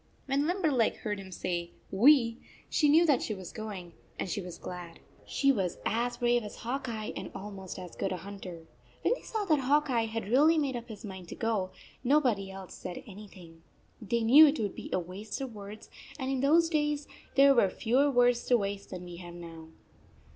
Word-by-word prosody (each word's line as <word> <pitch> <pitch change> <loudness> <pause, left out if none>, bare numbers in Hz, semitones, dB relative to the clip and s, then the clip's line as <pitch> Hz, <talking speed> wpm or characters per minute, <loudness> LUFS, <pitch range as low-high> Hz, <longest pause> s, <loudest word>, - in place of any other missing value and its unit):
When 280 +2 +1
Limberleg 315 - +2
heard 210 -2 -2
him 190 -1 -10
say 175 -1 -3 0.2
"We" 235 +2 +5 0.3
she 295 - +3
knew 325 +4 +6
that 290 -6 +3
she 215 - -2
was 185 -3 -8
going, 195 -6 -7 0.2
and - - -2
she 200 - -2
was 180 -2 -8
42 - - -24
glad. 175 -2 -7 0.3
She 275 0 +3
was 190 -8 -1
as 240 +3 0
brave 240 0 +2
as 210 - -8
Hawk 260 +2 -4
Eye 215 -2 -4
and - - -5
almost 195 -2 -7
as 180 -2 -8
good 195 - -2
a 185 - -2
hunter. 180 -3 -9 0.4
When - - +3
they - - -6
saw 435 -2 -3
that 310 -6 +3
Hawk 290 +2 +2
Eye 230 -2 +2
had 225 -1 -4
really 300 +7 +5
made 280 -4 0
up 240 0 -6
his 215 -1 -8
mind 190 -3 -8
to - - -7
go, 215 -5 -1 0.3
nobody 245 -8 +2
else 190 -1 -9
said 175 - -7
anything. 185 -5 -12 0.4
They 230 +2 0
knew 285 +8 +9
it 290 +1 +1
would 205 -3 -1
be - - -8
a - - +2
waste 185 +4 -6
of 265 -3 -5
words; 210 +1 -9 0.3
and 265 -2 -2
in 265 - 0
those 320 +5 +4
days 295 -2 0 0.3
there 275 0 +7
were 220 -7 +4
fewer 250 +9 +2
words 245 -2 +3
to 245 - +5
waste 200 -1 -4
than 180 -1 -7
we 175 -1 -9
have 175 -1 -9
now. 165 -2 -10
225 Hz, 210 wpm, -30 LUFS, 190-275 Hz, 0.4 s, knew